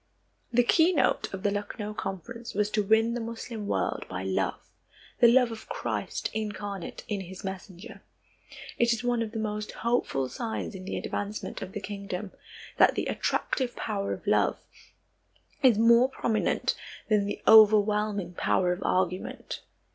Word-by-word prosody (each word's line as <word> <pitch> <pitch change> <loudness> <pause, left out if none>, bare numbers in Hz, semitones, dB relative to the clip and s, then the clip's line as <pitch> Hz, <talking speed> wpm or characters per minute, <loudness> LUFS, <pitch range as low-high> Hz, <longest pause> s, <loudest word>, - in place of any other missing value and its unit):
The 245 +1 +4
keynote 320 +3 +3
of 190 -1 -6
the 205 - +2
Lucknow 205 +1 -4
Conference 230 +4 -6
was 210 0 +1
to 215 - +2
win 220 +3 +3
the 240 - -2
Moslem 225 -1 -6
world - - -1
by 95 0 -4
love, 95 0 -1 0.6
the 240 - +8
love 250 -1 +4
of 225 - -9
Christ - - -3
incarnate 205 -3 -5
in 205 -2 -2
his 185 0 -9
messenger. 190 +2 -8 0.8
It 235 0 +4
is 230 - -4
one 245 -1 +1
of 220 -2 -3
the 225 - -5
most 210 -1 -3
hopeful 235 - +1
signs 225 - -4
in 185 -1 -8
the - - -3
advancement 205 -1 -4
of 190 - -6
the - - -3
kingdom 200 -1 -5 0.5
that - - +6
the - - -1
attractive 255 -3 -1
power 200 -2 -2
of - - -5
love - - +2 1.0
is 250 -6 +6
more 235 +3 +6
prominent 225 -4 0 0.3
than 210 -2 +2
the - - -4
overwhelming 210 -3 +5
power 180 0 +1
of 180 - -7
argument. 185 -1 -1
210 Hz, 155 wpm, -28 LUFS, 195-230 Hz, 1.0 s, the